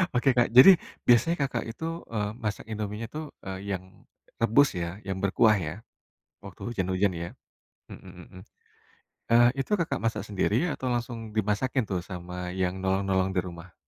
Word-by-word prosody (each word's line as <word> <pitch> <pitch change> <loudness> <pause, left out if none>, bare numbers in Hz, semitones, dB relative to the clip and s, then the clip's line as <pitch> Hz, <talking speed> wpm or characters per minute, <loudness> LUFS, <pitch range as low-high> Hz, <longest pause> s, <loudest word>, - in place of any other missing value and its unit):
Oke, 130 +2 +4
Kak. 120 -1 +3
Jadi, 175 +9 +10 0.3
biasanya 125 +8 +5
Kakak 135 -2 -1
itu, 165 +8 -5
eee, 105 -2 -2
masak 105 -1 -3
Indomienya 105 +1 -4
tuh, 155 +1 -5 0.2
eee, 95 +1 -4
yang 95 - -8 0.6
rebus 120 +5 +4
ya? 85 +3 -4
Yang 95 -2 -4
berkuah 105 +2 +4
ya? 80 -1 -4 0.7
Waktu - - -11
hujan-hujan 95 -1 0
ya, 85 0 -4 0.6
mhm 95 - -11 0.2
mhm, 90 -1 -13 0.9
eee, 120 +1 +7
itu 135 - -3
Kakak 165 -8 0
masak 110 -3 -1
sendiri 105 - +1
atau 130 -4 -4
langsung 115 -2 -4
dimasakin 110 +5 0
tuh 90 -2 -1
sama 90 -1 -6
yang 95 0 -1
nolong-nolong 95 0 0
di 90 - +1
rumah? 85 -1 -10
105 Hz, 155 wpm, -27 LUFS, 95-120 Hz, 0.9 s, Jadi